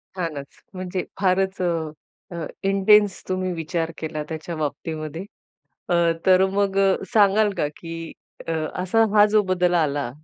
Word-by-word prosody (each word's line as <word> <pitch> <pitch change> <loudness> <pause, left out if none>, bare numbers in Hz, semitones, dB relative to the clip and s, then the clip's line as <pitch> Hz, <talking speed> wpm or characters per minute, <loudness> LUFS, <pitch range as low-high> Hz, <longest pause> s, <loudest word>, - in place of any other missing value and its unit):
छानच. 155 -6 -5 0.2
म्हणजे 185 0 -3 0.2
फारच 190 0 +1
अ, 180 - +1 0.7
अ, 170 -2 -4 0.2
इंटेन्स 200 0 +4
तुम्ही 185 0 -1
विचार 165 0 -3
केला 155 -1 -4
त्याच्या 160 +2 -5
बाबतीमध्ये. 155 +2 -4 0.6
अ, 175 - +1 0.3
तर 185 0 +6
मग 200 -1 0 0.4
सांगाल 210 0 +4
का - - +1
की 165 -1 -7 0.3
अ, 165 - -2 0.3
असा 225 +5 +3
हा 210 -1 +7
जो 210 0 +3
बदल 180 -1 +2
आला. 145 -6 0
180 Hz, 135 wpm, -23 LUFS, 160-195 Hz, 0.7 s, हा